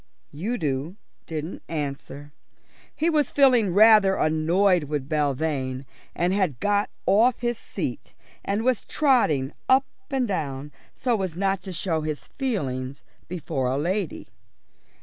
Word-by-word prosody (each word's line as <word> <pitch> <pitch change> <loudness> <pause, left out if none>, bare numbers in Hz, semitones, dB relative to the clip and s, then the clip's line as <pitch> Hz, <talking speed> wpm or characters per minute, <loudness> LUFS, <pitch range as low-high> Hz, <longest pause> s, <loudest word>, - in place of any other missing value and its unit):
Udo 160 - -2 0.3
didn't 160 +2 -5
answer. 145 -1 -5 0.6
He 320 - 0
was 305 -3 +2
feeling 250 -8 +4
rather 210 0 +6
annoyed 170 +3 +2
with 145 -2 -3
Belvane, 140 -3 -1 0.3
and 175 +2 +1
had 185 - 0
got 205 0 +1 0.2
off 225 +6 +4
his 240 -1 -1
seat - - -5 0.3
and 205 +3 -1
was 255 -2 +1
trotting 165 - +2 0.2
up 265 +1 +5 0.2
and 265 -3 0
down 145 -6 -3 0.2
so 240 -5 0
as 185 -4 -3
not 195 +1 0
to 190 - -7
show 165 -2 -1
his 155 -1 -5
feelings 140 - -3 0.2
before 155 -6 -2
a 130 +2 0
lady. 180 +4 -2
175 Hz, 130 wpm, -25 LUFS, 145-215 Hz, 0.6 s, rather